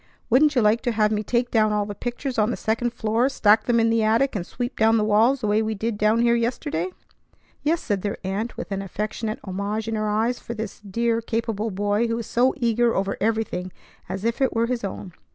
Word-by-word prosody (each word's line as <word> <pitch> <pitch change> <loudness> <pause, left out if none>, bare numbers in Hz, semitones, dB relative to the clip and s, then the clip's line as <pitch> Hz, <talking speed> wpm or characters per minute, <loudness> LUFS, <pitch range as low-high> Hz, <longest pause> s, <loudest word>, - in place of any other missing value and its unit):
Wouldn't 290 +4 +5
you 245 - +3
like 215 +3 +3
to 240 -2 -1
have 215 -1 +2
me 210 -1 0
take 240 +3 -1
down 215 -2 +3
all 210 -1 0
the 205 - -5
pictures 245 +3 -4
on 215 +1 +3
the - - -2
second 230 +2 -1
floor, 230 +2 +1
stack 215 -4 +3
them 235 -1 +3
in 225 0 +3
the 230 0 +2
attic, 225 +4 +2
and 190 - -1
sweep 245 +1 -4
down 225 +1 +4
the 215 - +2
walls 220 +6 +3
the 215 - -1
way 210 +1 +3
we 220 0 -2
did 220 +2 -2
down 215 +2 +2
here 235 0 +4
yesterday?" 230 -8 -1 0.7
"Yes," 325 +3 0
said 200 -3 -1
their 205 0 -3
aunt 200 +5 -3
with - - -6
an 195 0 -2
affectionate 215 +3 -4
homage 200 +3 -3
in 225 - -2
her 215 -1 -1
eyes 225 +4 0
for 235 - -7
this 215 -2 -6
dear, 230 +3 -1
capable 225 -1 -2
boy 205 +3 0
who 230 - -1
was 230 -1 -4
so 250 +5 +2
eager 235 -1 +2
over 195 +1 0
everything 215 -4 -1 0.4
as 190 +3 -4
if 230 +3 -1
it 265 - +2
were 230 +1 +2
his 245 -1 -2
own. 195 -2 -6
220 Hz, 235 wpm, -24 LUFS, 210-235 Hz, 0.7 s, Wouldn't